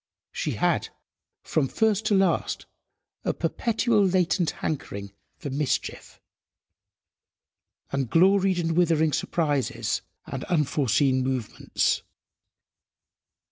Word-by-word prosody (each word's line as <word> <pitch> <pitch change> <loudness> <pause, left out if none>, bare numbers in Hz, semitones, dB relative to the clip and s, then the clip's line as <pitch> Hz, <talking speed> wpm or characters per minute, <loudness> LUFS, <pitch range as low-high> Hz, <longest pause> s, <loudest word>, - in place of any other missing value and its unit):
She - - -2
had, - - 0 0.5
from 145 -4 0
first 215 - +1
to 210 - +3
last, 190 -3 +1 0.6
a - - 0
perpetual 230 -2 +1
latent 180 -2 +2 0.2
hankering 100 -10 -4 0.2
for 145 - -6
mischief, 140 +1 -2 1.7
and 135 -3 -1
gloried 190 - +4
in 165 -1 0
withering 160 -3 +3
surprises 130 - -1 0.2
and 135 -1 -5
unforeseen 140 - +2
movements. 130 -4 -1
160 Hz, 90 wpm, -26 LUFS, 135-190 Hz, 1.7 s, gloried